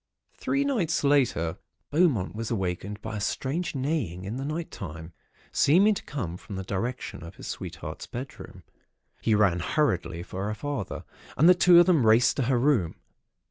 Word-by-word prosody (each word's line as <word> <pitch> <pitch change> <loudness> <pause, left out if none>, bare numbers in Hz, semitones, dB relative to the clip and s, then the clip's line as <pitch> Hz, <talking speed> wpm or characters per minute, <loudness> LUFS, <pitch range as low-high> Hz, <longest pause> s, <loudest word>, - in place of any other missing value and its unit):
"Three 275 +1 0
nights 190 - 0
later, 125 - +2 0.3
Beaumont 145 - +2
was 115 +1 -4
awakened 100 -1 -3
by 110 -1 -4
a - - -4
strange 155 - -2
neighing 130 - -2
in 110 +5 -4
the 135 - -4
night 160 +3 -4
time, 80 -2 -8 0.4
seeming 190 +9 +4
to - - -6
come 95 - -5
from 100 - -9
the 95 - -4
direction 115 +6 -4
of 85 - -10
his - - -11
sweetheart's - - -6
bedroom. 130 +3 -8 0.6
He 110 - +2
ran 100 -5 +3
hurriedly 85 - 0
for 95 +3 -5
her 105 - -2
father, 135 -3 -4 0.3
and 155 - +6
the 180 - +9
two 175 -1 +6
of 175 - +7
them 165 -7 +4
raced 115 +2 +5
to 135 - +1
her 130 - +3
room. 120 - +2
120 Hz, 175 wpm, -27 LUFS, 95-150 Hz, 0.6 s, the